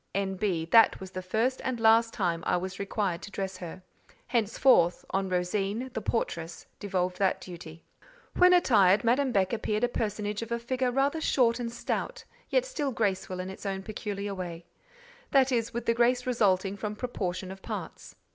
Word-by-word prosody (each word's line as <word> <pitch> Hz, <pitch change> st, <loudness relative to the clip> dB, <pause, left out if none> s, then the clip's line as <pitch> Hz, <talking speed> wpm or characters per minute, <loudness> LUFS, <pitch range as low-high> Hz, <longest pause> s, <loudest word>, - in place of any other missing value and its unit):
N.B.—That 195 Hz, +1 st, +3 dB
was 190 Hz, -1 st, -9 dB
the 185 Hz, 0 st, -5 dB
first 225 Hz, +8 st, 0 dB
and 255 Hz, -2 st, -2 dB
last 225 Hz, +1 st, +5 dB
time 170 Hz, -6 st, -1 dB
I 180 Hz, -, +3 dB
was 185 Hz, +1 st, -5 dB
required 200 Hz, -3 st, -2 dB
to -, -, -8 dB
dress 195 Hz, -1 st, -4 dB
her. 180 Hz, 0 st, -8 dB, 0.4 s
Henceforth, 225 Hz, -5 st, +3 dB
on 195 Hz, 0 st, 0 dB
Rosine, 195 Hz, +7 st, -1 dB
the 225 Hz, -, -3 dB
portress, 170 Hz, -8 st, -3 dB
devolved 185 Hz, -2 st, -2 dB
that 195 Hz, -2 st, +2 dB
duty. 170 Hz, -3 st, -10 dB, 0.5 s
When 360 Hz, 0 st, +6 dB
attired, 210 Hz, -, +5 dB
Madame 255 Hz, +3 st, +2 dB
Beck 195 Hz, -1 st, +1 dB
appeared 215 Hz, 0 st, -1 dB
a -, -, +5 dB
personage 210 Hz, -2 st, -3 dB
of 230 Hz, 0 st, -7 dB
a 235 Hz, -, +1 dB
figure 255 Hz, +2 st, -1 dB
rather 275 Hz, +5 st, +1 dB
short 240 Hz, -5 st, +2 dB
and 235 Hz, -1 st, -3 dB
stout, -, -, -3 dB, 0.3 s
yet -, -, +2 dB
still 300 Hz, -, -2 dB
graceful 190 Hz, -5 st, -1 dB
in 185 Hz, +1 st, -4 dB
its 190 Hz, -, -11 dB
own 195 Hz, -1 st, -3 dB
peculiar 205 Hz, -1 st, -4 dB
way; 175 Hz, -3 st, -6 dB, 0.6 s
that 270 Hz, -1 st, +4 dB
is, 230 Hz, -2 st, 0 dB
with 235 Hz, 0 st, -4 dB
the 230 Hz, -, +3 dB
grace 245 Hz, +1 st, +2 dB
resulting 200 Hz, -5 st, +1 dB
from 210 Hz, +1 st, -4 dB
proportion 185 Hz, -6 st, -4 dB
of 195 Hz, 0 st, -10 dB
parts. -, -, -7 dB
205 Hz, 175 wpm, -28 LUFS, 185-235 Hz, 0.6 s, When